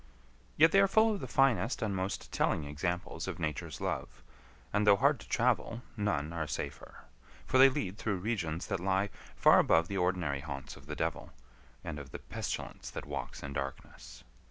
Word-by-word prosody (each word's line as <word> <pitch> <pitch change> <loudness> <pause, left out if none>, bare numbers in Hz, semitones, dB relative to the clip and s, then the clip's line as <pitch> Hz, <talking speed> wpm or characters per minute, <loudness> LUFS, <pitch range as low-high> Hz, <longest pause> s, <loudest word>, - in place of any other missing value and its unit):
Yet 160 +2 +7
they 195 - +6
are 195 - +6
full 220 +3 +4
of 205 - -3
the 130 - -5
finest 125 -4 +2
and 105 -3 -1
most 95 +1 -3
telling 75 - +1
examples 85 +5 -3
of - - -4
Nature's 75 -3 -3
love; - - -4 0.5
and 105 +1 +2
though 100 - +8
hard 100 - +3
to - - -13
travel, 115 +1 +1
none 95 -8 -1
are 80 -2 -2
safer. 70 -1 -6 0.4
For 130 - +2
they 135 +1 +10
lead 105 -8 -3
through 105 -4 -1
regions 90 -5 -2
that - - -2
lie 95 +2 +1 0.2
far - - +6
above 80 0 +3
the 100 - -2
ordinary 90 -6 0
haunts 70 -2 -7
of - - -15
the - - -4
devil, - - -3 0.5
and 75 -2 -5
of 70 -1 -9
the - - -6
pestilence - - -5
that - - -6
walks 70 -2 -5
in 70 0 -5
darkness. 65 -3 -6
90 Hz, 185 wpm, -32 LUFS, 75-110 Hz, 0.5 s, they